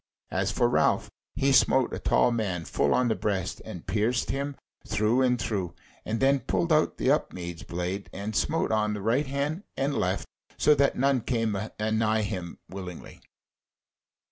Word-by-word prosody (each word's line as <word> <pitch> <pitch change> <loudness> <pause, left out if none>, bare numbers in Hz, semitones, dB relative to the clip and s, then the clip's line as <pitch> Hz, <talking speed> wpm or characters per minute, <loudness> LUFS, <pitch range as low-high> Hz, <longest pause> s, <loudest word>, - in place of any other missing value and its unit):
As 95 +1 0
for 120 +3 +2
Ralph, 120 - +2 0.2
he 140 +1 +2
smote 130 -1 +4
a - - -3
tall - - +3
man 95 -8 -2
full - - +1
on 125 - +3
the 115 - +2
breast 100 -4 -2
and 85 - -8
pierced 110 +5 0
him 140 +1 -3 0.3
through 110 +5 +2
and 125 -2 +2
through, 95 -6 -2 0.3
and 110 +1 -2
then 135 +1 +4
pulled 170 +5 0
out 155 0 +2
the 130 - +2
Upmeads 90 - -2
blade 90 +2 -4
and 100 +2 -5
smote 160 +3 +1
on 105 -1 +1
the 105 - -5
right 125 +7 +1
hand 140 +6 -2 0.2
and 135 +2 0
the - - -2
left, 95 +2 -1 0.3
so 150 - +5
that 140 -1 +2
none 135 -1 +2
came 115 -3 0 0.2
anigh 110 0 +1
him 90 -4 -4
willingly. 90 -3 -9
110 Hz, 170 wpm, -27 LUFS, 100-135 Hz, 0.3 s, so